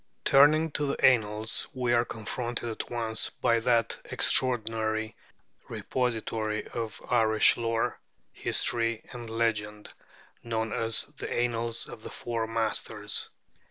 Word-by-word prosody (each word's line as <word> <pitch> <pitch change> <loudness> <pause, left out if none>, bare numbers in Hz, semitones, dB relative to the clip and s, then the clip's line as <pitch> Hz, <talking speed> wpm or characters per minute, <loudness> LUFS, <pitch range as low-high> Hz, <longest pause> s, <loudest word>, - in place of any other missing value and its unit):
Turning 155 +3 +5
to 145 0 -1
the 140 - +1
Annals, 110 -3 +2
we 125 -2 0
are 120 0 +4
confronted 120 +2 -4
at 110 - -5
once 115 -2 0
by 115 -2 +1
that 115 -1 +1
extraordinary 110 -3 +1 0.5
repository 110 -3 -2
of 115 -2 -5
Irish 110 -3 +5
lore, 115 -1 -1 0.3
history, 115 -1 0
and 120 -2 -8
legend 105 -2 -2 0.5
known 110 -1 -2
as 115 0 +1
'The 145 - -9
Annals 115 -1 -1
of 120 -2 -10
the - - -8
Four 115 -2 -3
Masters.' 115 0 -1
115 Hz, 120 wpm, -28 LUFS, 110-120 Hz, 0.5 s, Turning